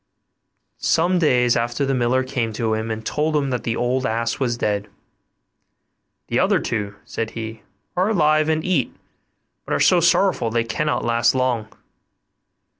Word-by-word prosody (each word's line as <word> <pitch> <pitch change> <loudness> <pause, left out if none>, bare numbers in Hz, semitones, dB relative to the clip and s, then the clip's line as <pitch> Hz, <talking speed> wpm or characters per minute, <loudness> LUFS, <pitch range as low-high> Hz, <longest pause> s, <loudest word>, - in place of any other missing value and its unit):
Some 175 +2 +2
days 125 -7 +3
after, 120 +4 -1
the 135 - 0
miller 130 +1 +1
came 125 -4 -2
to 110 0 -1
him 110 +1 -2
and 110 0 -4
told 155 +1 -1
him 140 -2 0
that 125 - -1
the 115 - -1
old 125 +2 0
ass 115 -2 -1
was 120 -3 0
dead; 105 -2 -1 1.4
'The - - 0
other - - +3
two,' 100 -3 -3
said 115 -1 -4
he, 110 -1 -6 0.3
'are 185 +3 +2
alive 155 -5 +3
and 155 0 0
eat, 180 -9 0 0.7
but - - -2
are - - 0
so 180 - +5
sorrowful 175 -6 +2
that 115 - -7
they 115 - +3
cannot 150 +6 -1
last 120 +1 +2
long. 125 -4 0
125 Hz, 165 wpm, -21 LUFS, 115-150 Hz, 1.4 s, so